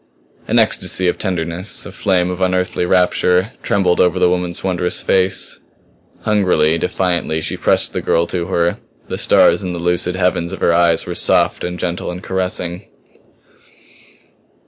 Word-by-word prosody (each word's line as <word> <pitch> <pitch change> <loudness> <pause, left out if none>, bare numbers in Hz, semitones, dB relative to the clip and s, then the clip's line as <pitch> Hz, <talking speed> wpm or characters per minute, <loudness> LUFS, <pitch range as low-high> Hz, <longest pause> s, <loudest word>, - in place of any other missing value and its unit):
An - - +1
ecstasy 95 - +2
of 90 - -1
tenderness, 90 0 -2
a 100 - -8
flame 95 -2 0
of 90 +1 -6
unearthly 90 -1 0
rapture, 90 +2 +2
trembled 95 -3 +1
over 90 -2 +3
the 90 - +3
woman's 90 -1 -2
wondrous 90 -1 -1
face. 95 0 +1 0.6
Hungrily, 90 -6 +2
defiantly, 90 -4 -1
she - - -4
pressed - - +1
the - - -2
girl 85 - +1
to 85 0 -3
her; 85 -2 0 0.3
the - - -5
stars - - +4
in 90 -2 -4
the 85 -1 -5
lucid 90 +1 0
heavens 90 -1 -1
of - - -6
her 85 - +2
eyes 85 -1 +3
were - - -5
soft - - +2
and 90 0 -4
gentle 85 0 -3
and 90 +1 -7
caressing. 90 0 -3
90 Hz, 155 wpm, -17 LUFS, 85-95 Hz, 0.6 s, stars